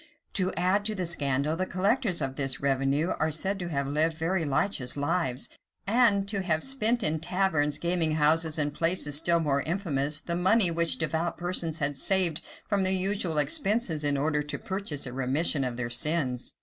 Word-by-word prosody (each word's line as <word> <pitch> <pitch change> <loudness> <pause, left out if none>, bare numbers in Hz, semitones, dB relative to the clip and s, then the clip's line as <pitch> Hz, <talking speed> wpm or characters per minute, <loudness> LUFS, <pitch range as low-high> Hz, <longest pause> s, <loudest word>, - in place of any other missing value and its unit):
[*] - - -47
To 185 -1 +1
add 185 +4 +1
to 215 0 -1
the 185 -2 -3
scandal, 145 -2 0
the 185 +2 -2
collectors 200 - 0
of 135 0 -3
this 135 -2 -2
revenue 140 +4 0
are 155 - +1
said 190 +6 -1
to 175 - -4
have 140 -4 -2
lived 155 +3 0
very 165 +1 -1
licentious 135 -2 -1
lives, 145 -2 -1 0.4
and 205 -2 +3
to 200 -1 -1
have 160 -4 0
spent 240 -3 +1
in 155 -1 +1
taverns, 165 -4 0
gaming 170 -2 -1
houses, 155 +1 +2
and 145 -1 -1
places 165 -3 +1
still 170 +3 +3
more 140 -3 0
infamous, 155 -5 -1
the 170 +3 -4
money 185 +1 +4
which 170 0 +1
devout 160 +1 -2
persons 175 -2 -1
had 145 -3 -1
saved 180 +1 +2 0.3
from 205 -2 0
their 185 - +5
usual 190 -3 +1
expenses, 160 - +1
in 145 -1 +1
order 150 +1 0
to 150 0 -5
purchase 190 -8 -4
a 125 - -7
remission 135 +3 0
of 125 -2 -3
their 120 -1 -3
sins. 130 -1 -1
160 Hz, 190 wpm, -27 LUFS, 145-185 Hz, 0.4 s, their